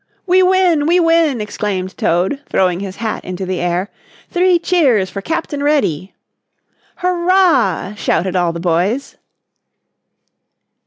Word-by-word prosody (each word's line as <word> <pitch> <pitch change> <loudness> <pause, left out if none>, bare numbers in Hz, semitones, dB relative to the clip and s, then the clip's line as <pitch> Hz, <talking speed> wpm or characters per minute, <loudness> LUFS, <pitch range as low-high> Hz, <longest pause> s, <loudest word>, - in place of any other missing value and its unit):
"We 370 0 +4
win, 365 -5 +3
we 350 +2 +3
win!" 330 -7 +2
exclaimed 195 -3 -4
Toad, 185 +12 0
throwing 180 -2 +1
his 195 -1 -6
hat 225 -2 -4
into 185 +1 -5
the 185 -1 -3
air. 175 +3 -2 0.4
"Three 360 0 +3
cheers 270 - +1
for 195 - -5
Captain 320 +2 -3
Reddy!" 265 - 0 0.8
"Hurrah!" 350 - +1
shouted 190 -3 -1
all 175 -2 +1
the 170 - -6
boys. 185 +10 -1
225 Hz, 120 wpm, -16 LUFS, -, 0.8 s, We